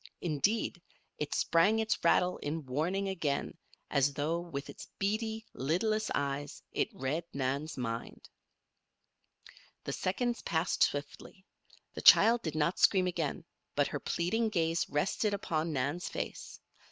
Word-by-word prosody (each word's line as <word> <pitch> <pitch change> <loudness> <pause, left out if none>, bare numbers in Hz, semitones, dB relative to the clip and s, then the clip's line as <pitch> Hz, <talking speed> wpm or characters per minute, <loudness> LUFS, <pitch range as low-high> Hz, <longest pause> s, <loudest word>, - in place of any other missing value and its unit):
Indeed, 175 +4 0 0.4
it 150 - -2
sprang 170 +7 +3
its 220 -1 0
rattle 180 +2 +3
in 155 +1 -4
warning 170 +10 -1
again 165 -6 -2 0.4
as 140 -1 +2
though, 155 +4 0
with 150 -5 -6
its - - -10
beady, 220 +2 -1
lidless 215 - 0
eyes, 140 0 -3
it - - 0
read 140 +6 -2
Nan's 140 +3 -2
mind. 115 -2 -5 1.6
The - - -3
seconds 240 +6 -1
passed 165 +2 -1
swiftly. 145 +7 -1 0.5
The - - -6
child 230 +1 +8
did 160 -6 -4
not 155 +3 +1
scream 185 -2 +5
again, 170 -3 -2 0.3
but 145 -1 +2
her 145 - -3
pleading 220 - 0
gaze 165 -4 0
rested 195 +7 0
upon 165 -4 -2
Nan's 145 +5 -1
face. - - -6
165 Hz, 130 wpm, -32 LUFS, 145-195 Hz, 1.6 s, child